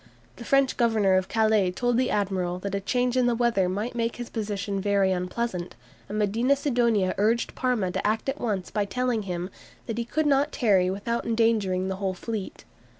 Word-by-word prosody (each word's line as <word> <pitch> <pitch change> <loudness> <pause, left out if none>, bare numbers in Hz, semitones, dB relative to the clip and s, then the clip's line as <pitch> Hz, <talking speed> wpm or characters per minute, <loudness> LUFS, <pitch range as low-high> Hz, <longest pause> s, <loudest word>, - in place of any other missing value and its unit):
The 235 - -8
French 275 -1 +2
Governor 220 -5 +3
of 185 0 +1
Calais 220 -4 +2
told 245 +6 0
the 255 0 +2
admiral 185 -3 -1
that 200 +1 -5
a 200 - 0
change 245 +5 0
in 250 -1 +3
the 240 - +2
weather 230 -6 +2
might 210 +6 -3
make 230 -1 -1
his 240 -1 -7
position 205 -3 -3
very 200 -1 +2
unpleasant, 180 0 -3 0.3
and 210 - -3
Medina 225 +6 +2
Sidonia 235 -9 +1
urged 225 +3 +1
Parma 240 -8 0
to - - -1
act 220 +4 -1
at 270 - -2
once 205 -6 -2
by 210 - 0
telling 250 +2 -1
him 180 -1 -4 0.3
"that 230 0 -4
he - - 0
could 310 +6 -1
not 285 +1 +3
tarry 195 -7 +3
without 220 +6 -2
endangering 220 -5 +1
the 190 0 -3
whole 190 -1 -2
fleet." 215 0 -6
215 Hz, 195 wpm, -26 LUFS, 190-240 Hz, 0.3 s, Governor